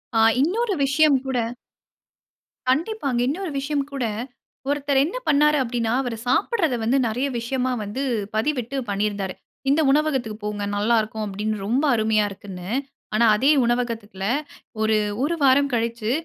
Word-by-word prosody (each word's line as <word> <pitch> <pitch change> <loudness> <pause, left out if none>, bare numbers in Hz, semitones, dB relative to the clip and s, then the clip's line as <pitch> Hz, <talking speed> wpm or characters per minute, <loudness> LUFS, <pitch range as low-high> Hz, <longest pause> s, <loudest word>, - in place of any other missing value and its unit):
ஆ. - - +4 0.2
இன்னொரு 405 - +1
விஷயம் 280 +1 +4
கூட 265 -2 -1 1.3
கண்டிப்பாங்க. 280 - 0
இன்னொரு 345 +5 -2
விஷயம் 285 0 -1
கூட, 275 -3 -2 0.6
ஒருத்தர் 285 -1 +1
என்ன 355 +11 -4
பண்ணாரு 300 0 +4
அப்டின்னா, 230 -2 -1
அவரு 240 -3 -4
சாப்பிடுறத 325 - +1
வந்து 250 +5 +2
நெறைய 245 +5 -1
விஷயமா 255 +2 -1
வந்து 205 +6 -4 0.3
பதிவிட்டு 250 +2 -1
பண்ணியிருந்தாரு. 200 -1 -1 0.4
"இந்த 290 +3 +4
உணவகத்துக்கு 270 -7 0
போங்க 210 -1 -3
நல்லாருக்கும்" 220 0 +1
அப்டின்னு 210 +2 -2
ரொம்ப 255 +7 +1
அருமையா 220 -1 +2
இருக்குன்னு. 190 -2 -9 0.5
ஆனா, 235 +2 +4
அதே 270 +7 +4
உணவகத்துல 230 -5 -2 0.6
ஒரு 220 0 +3 0.3
1 335 +3 +1
வாரம் 275 +1 +4
கழிச்சி 230 -1 -1
250 Hz, 130 wpm, -23 LUFS, 220-285 Hz, 1.3 s, ஆ